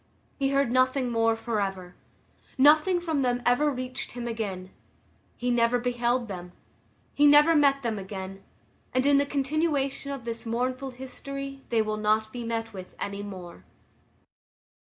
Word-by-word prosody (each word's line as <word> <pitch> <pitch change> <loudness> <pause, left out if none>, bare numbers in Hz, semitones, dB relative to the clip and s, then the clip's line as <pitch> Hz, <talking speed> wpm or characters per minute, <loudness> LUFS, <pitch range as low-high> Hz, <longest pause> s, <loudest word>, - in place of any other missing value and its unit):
He 270 -1 +2
heard 275 -3 +2
nothing 255 0 +2
more 225 -1 +2
forever. 195 -6 -3 0.6
Nothing 310 +6 +5
from 320 -5 -1
them 245 -1 0
ever 245 +5 +3
reached 255 -2 -5
him 240 0 -5
again; 195 -5 -4 0.7
he 245 0 -1
never 235 0 +3
beheld 240 0 0
them; 180 -3 -7 0.6
he 290 0 +5
never 295 +3 +7
met 275 -2 +4
them 225 -3 -1
again; 190 0 -7 0.5
and 255 +1 +2
in 285 0 +5
the 285 - +1
continuation 280 -1 -1
of 270 -4 -6
this 230 -1 -4
mournful 255 +3 -2
history 275 +2 -7
they 225 -2 +2
will 215 0 -2
not 215 +1 +1
be 245 -1 -5
met 225 -1 -3
with 185 -2 -9
any 200 0 -4
more. 185 - -9
245 Hz, 150 wpm, -27 LUFS, 220-275 Hz, 0.7 s, never